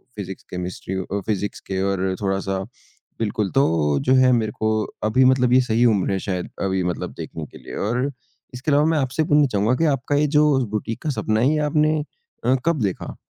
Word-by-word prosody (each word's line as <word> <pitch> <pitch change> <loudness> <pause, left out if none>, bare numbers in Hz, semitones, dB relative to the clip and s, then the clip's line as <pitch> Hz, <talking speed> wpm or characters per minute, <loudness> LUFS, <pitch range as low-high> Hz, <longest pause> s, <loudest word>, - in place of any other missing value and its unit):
Physics, 95 -2 -7
chemistry 90 +1 -5
अ, 95 +2 -3
physics 105 -1 -2
के 95 -1 -2
और 95 -1 -1
थोड़ा-सा 95 -1 -1 0.6
बिल्कुल, 105 -2 -1
तो 80 - +2
जो 130 - +2
है, 130 -1 +5
मेरे 110 -3 +1
को 110 0 +1 0.3
अभी 110 +5 +3
मतलब 125 -1 +4
ये 130 - +6
सही 120 -1 +2
उम्र 100 -6 +2
है 95 - 0
शायद 90 -2 -3
अभी 95 -1 0
मतलब 90 -1 -3
देखने 80 -2 -6
के - - -14
लिए - - -10
और 125 +4 0 0.4
इसके 125 +4 -2
अलावा 145 +2 +4
मैं 160 -1 +2
आपसे 135 +3 0
पूछना 150 -3 +4
चाहूँगा 110 +2 +1
कि 165 - +1
आपका 135 +3 -2
ये 150 +1 +3
जो 150 0 +5 0.2
बुटीक 110 +2 -3
का 155 - -1
सपना 110 -6 0
है 125 +4 +4
ये - - +1
आपने 155 0 +2 0.5
अ, 130 - +4
कब 165 -5 +1
देखा? 95 -3 -3
110 Hz, 205 wpm, -22 LUFS, 95-130 Hz, 0.6 s, ये